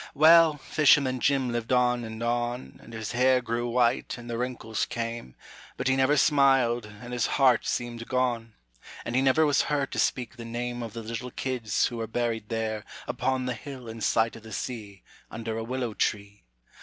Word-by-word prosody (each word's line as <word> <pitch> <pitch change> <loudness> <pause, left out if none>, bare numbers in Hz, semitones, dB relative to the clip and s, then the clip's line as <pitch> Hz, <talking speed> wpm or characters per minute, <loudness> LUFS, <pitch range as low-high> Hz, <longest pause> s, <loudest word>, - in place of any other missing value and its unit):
Well, 160 0 +7
fisherman 140 -2 +3
Jim 135 -2 +1
lived 120 0 -3
on 125 -1 +3
and 110 0 -6
on, 120 - -2
And 115 - -14
his 110 -2 -5
hair 130 +1 +4
grew 120 0 -2
white 120 +1 +1
and 120 0 -10
the 120 - -3
wrinkles 120 -2 -3
came, 115 - -5 0.4
But - - -2
he 130 - +3
never 135 +3 +3
smiled 135 -6 +3
and 110 +4 -10
his 120 -2 +1
heart 130 -4 +4
seemed 120 -1 -3
gone, 120 -3 -1 0.5
And 115 - -3
he 130 - +4
never 135 +4 +4
was 145 -2 +3
heard 145 -2 0
to - - -3
speak 125 -1 -1
the 115 - -7
name 120 +1 -4
Of 115 -3 -6
the 115 - -6
little 115 +3 -5
kids 125 -5 -1
who 120 - -3
were 115 -1 -3
buried 115 -2 -2
there, 110 -2 -2 0.2
Upon 130 -1 -1
the 125 - -1
hill 135 -4 -9
in 115 0 -8
sight 115 +1 +2
o' - - -9
the 110 0 -13
sea, 100 -3 -6 0.3
Under 115 0 -5
a 115 - -3
willow 125 -1 -3
tree. 100 -1 -2
120 Hz, 195 wpm, -27 LUFS, 115-130 Hz, 0.5 s, Well